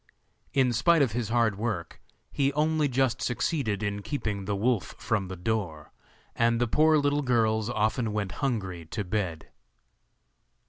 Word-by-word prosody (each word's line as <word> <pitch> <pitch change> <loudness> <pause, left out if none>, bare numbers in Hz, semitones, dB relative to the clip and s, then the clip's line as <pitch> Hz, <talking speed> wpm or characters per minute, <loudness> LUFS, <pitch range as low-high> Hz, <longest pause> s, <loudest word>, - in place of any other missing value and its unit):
In 130 -3 +3
spite 155 +7 +4
of 130 - 0
his 115 -1 -2
hard 115 -4 +1
work 105 -7 -3 0.3
he 140 -1 +1
only 155 0 +2
just 130 -1 +1
succeeded 120 - -1
in 100 -1 -2
keeping 105 -6 -3
the 100 +1 -1
wolf 110 0 0
from 105 -4 -1
the 95 - -6
door, 90 -5 -3 0.4
and 115 0 +2
the 120 - +3
poor 155 +6 +4
little 145 0 +1
girls 110 -4 +1
often 110 0 0
went 105 -3 -2
hungry 95 -11 -2
to 105 +6 -4
bed. 90 -5 -3
115 Hz, 150 wpm, -28 LUFS, 100-130 Hz, 0.4 s, spite